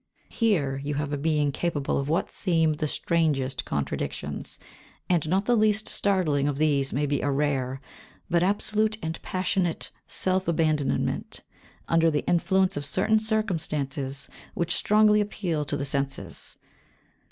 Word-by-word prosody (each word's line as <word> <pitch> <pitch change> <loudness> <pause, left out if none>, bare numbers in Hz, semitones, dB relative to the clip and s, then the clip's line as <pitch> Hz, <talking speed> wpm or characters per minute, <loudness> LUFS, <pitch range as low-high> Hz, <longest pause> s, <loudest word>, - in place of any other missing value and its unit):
Here 165 - +1
you 145 0 -2
have 145 0 -2
a - - +2
being 150 -1 +1
capable 145 -3 -1
of 140 +1 -3
what 165 +4 0
seem 165 -4 +2
the 150 +1 -2
strangest 145 -6 0
contradictions, 70 -1 -3 0.5
and 170 -4 +1
not 190 +3 +2
the 245 - +3
least 215 -1 +2
startling 170 -11 +1
of 145 -2 -1
these 140 -3 +2
may 145 +3 0
be 145 -1 0
a 145 - 0
rare, 135 -2 0 0.5
but 170 -2 +2
absolute 215 +3 +2
and 160 0 -4
passionate, 185 -2 -1 0.2
self 185 0 0
abandonment, 155 -4 0 0.5
under 165 0 +4
the 150 -2 -1
influence 190 +2 +2
of 145 - -3
certain 220 +9 +2
circumstances 155 - -2 0.3
which 170 0 0
strongly 210 +1 +4
appeal 180 -7 -2
to 145 0 -1
the 140 - -2
senses. 135 - -3
160 Hz, 140 wpm, -26 LUFS, 140-190 Hz, 0.5 s, under